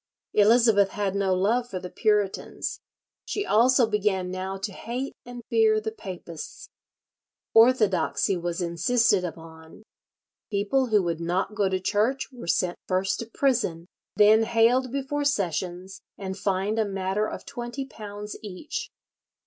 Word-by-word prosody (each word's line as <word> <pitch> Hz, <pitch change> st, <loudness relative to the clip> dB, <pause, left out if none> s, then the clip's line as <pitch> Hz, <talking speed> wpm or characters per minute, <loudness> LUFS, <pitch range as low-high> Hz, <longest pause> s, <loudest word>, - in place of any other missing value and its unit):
Elizabeth 215 Hz, -1 st, +5 dB
had 200 Hz, -2 st, -2 dB
no 200 Hz, -1 st, 0 dB
love 230 Hz, +6 st, +1 dB
for 190 Hz, -, -4 dB
the 180 Hz, 0 st, -8 dB
Puritans; 210 Hz, -3 st, -1 dB, 0.4 s
she 410 Hz, -, -3 dB
also 250 Hz, -, +4 dB
began 205 Hz, -4 st, 0 dB
now 190 Hz, +1 st, -4 dB
to 195 Hz, +2 st, -4 dB
hate 245 Hz, +7 st, -5 dB
and 245 Hz, -1 st, -8 dB
fear 440 Hz, -1 st, +3 dB
the 440 Hz, 0 st, -4 dB
papists. 205 Hz, -, -9 dB, 0.8 s
Orthodoxy 215 Hz, -7 st, +4 dB
was 175 Hz, 0 st, -3 dB
insisted 200 Hz, +3 st, +2 dB
upon. 160 Hz, +2 st, -9 dB, 0.7 s
People 210 Hz, +6 st, +1 dB
who 210 Hz, -4 st, +3 dB
would 170 Hz, -1 st, -2 dB
not 180 Hz, +5 st, -1 dB
go 205 Hz, -2 st, +1 dB
to 190 Hz, 0 st, 0 dB
church 220 Hz, +9 st, 0 dB
were 245 Hz, -8 st, -10 dB
sent 175 Hz, +1 st, 0 dB
first 185 Hz, +1 st, 0 dB
to 230 Hz, -, -5 dB
prison, 230 Hz, -10 st, 0 dB, 0.3 s
then 215 Hz, +2 st, +6 dB
haled 235 Hz, +3 st, +3 dB
before 280 Hz, +2 st, -2 dB
Sessions 185 Hz, -, -2 dB, 0.2 s
and 190 Hz, -1 st, -5 dB
fined 200 Hz, +2 st, -1 dB
a 220 Hz, -, +2 dB
matter 195 Hz, +1 st, -1 dB
of -, -, -8 dB
twenty 240 Hz, +3 st, -5 dB
pounds 210 Hz, -4 st, -8 dB
each. 295 Hz, -, -6 dB
210 Hz, 140 wpm, -26 LUFS, 185-240 Hz, 0.8 s, then